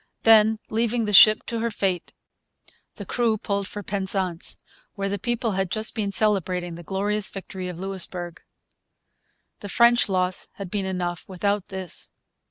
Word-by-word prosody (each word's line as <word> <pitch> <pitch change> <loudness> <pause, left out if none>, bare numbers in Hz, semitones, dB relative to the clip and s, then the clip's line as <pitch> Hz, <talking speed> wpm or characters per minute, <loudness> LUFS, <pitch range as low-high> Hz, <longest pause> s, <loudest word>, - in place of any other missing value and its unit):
Then, 220 -1 +6
leaving 230 +1 0
the 210 - -2
ship 215 +3 +8
to 230 - -3
her 235 +1 0
fate, 195 -5 -2 0.8
the - - -8
crew 230 -3 +1
pulled 200 -1 -2
for 205 0 -7
Penzance, 190 -3 -3 0.4
where 195 -1 -2
the 200 0 -3
people 240 +1 -1
had 190 -1 -1
just 215 +3 -1
been 205 -3 -2
celebrating 185 -4 +2
the 170 - -9
glorious 200 +4 -1
victory 190 -1 -7
of 180 -2 -7
Louisbourg. 180 -2 -4 1.2
The 205 - -8
French 235 +2 +4
loss 185 -1 -1
had 195 -3 -8
been 200 -2 -1
enough 175 -2 -3
without 200 +1 -1
this. 190 -3 -6
195 Hz, 155 wpm, -24 LUFS, 185-215 Hz, 1.2 s, ship